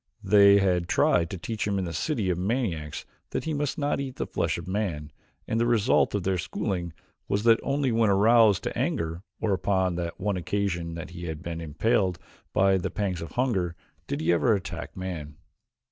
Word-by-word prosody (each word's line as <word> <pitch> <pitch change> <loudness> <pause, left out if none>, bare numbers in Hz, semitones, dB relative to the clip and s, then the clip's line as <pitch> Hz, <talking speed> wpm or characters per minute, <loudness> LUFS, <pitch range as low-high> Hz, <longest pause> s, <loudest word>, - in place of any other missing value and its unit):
They 100 0 +7
had 90 -3 +2
tried 85 -1 +3
to 95 - -5
teach 105 +5 -3
him 100 -1 0
in 95 - -1
the 85 - -5
city 105 - -1
of 85 - -1
maniacs 90 - -2 0.2
that - - -3
he 160 - -2
must 145 -2 -2
not 145 -1 0
eat 135 -2 -4
the - - -3
flesh - - -1
of 85 0 -8
man, 90 -7 -2 0.4
and 110 - 0
the 120 - +2
result 115 -2 +3
of 100 - -1
their 95 -1 0
schooling 85 +1 -3 0.3
was 100 +1 0
that 115 -1 +5
only 140 -2 0
when 115 -1 +3
aroused 105 +1 +5
to - - -3
anger 80 +1 -1 0.2
or 105 -3 +1
upon 95 -2 +1
that 85 -1 -4
one 100 0 -1
occasion 85 -3 -2
that 85 +1 -7
he 85 0 -7
had 80 0 -6
been 85 -1 -5
impelled 90 +4 +1 0.3
by 95 0 +3
the 95 - -2
pangs 95 -3 -2
of 85 -2 -7
hunger, 95 -10 0 0.3
did 70 - -3
he 85 +2 +3
ever 110 +6 +3
attack 85 -2 -6
man. 85 -6 -5
95 Hz, 200 wpm, -27 LUFS, 85-110 Hz, 0.4 s, They